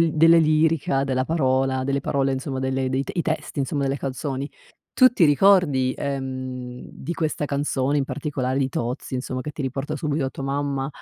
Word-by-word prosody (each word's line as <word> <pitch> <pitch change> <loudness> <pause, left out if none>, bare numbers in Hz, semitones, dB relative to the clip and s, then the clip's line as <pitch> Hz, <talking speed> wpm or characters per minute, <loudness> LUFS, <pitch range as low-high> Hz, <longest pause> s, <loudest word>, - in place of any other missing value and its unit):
l 165 -2 +3
delle 165 +2 +6
lirica, 155 -3 +2
della 130 -1 0
parola, 130 -4 +1
delle 140 +1 0
parole, 135 -1 0
insomma, 130 0 -3
delle 130 0 -1
i 130 +1 0
te - - -6
i 175 - +1
testi, 160 -2 -3
insomma, 140 +1 -1
delle 135 0 -1
canzoni. 135 +1 -4 0.4
Tu 255 -1 +7
ti 170 -9 +4
ricordi, 145 -5 +4
ehm, 130 -2 -5
di 170 - -6
questa 155 -2 -2
canzone, 140 0 0
in 140 - +1
particolare, 135 -3 -2
di 135 -1 0
Tozzi, 125 +3 -4
insomma, 130 0 -3
che 150 - -5
ti 150 - -9
riporta 135 +3 -3
subito 150 -1 -1
a 130 - -2
tua 135 - -7
mamma, 140 -1 -1
135 Hz, 190 wpm, -23 LUFS, 130-150 Hz, 0.4 s, Tu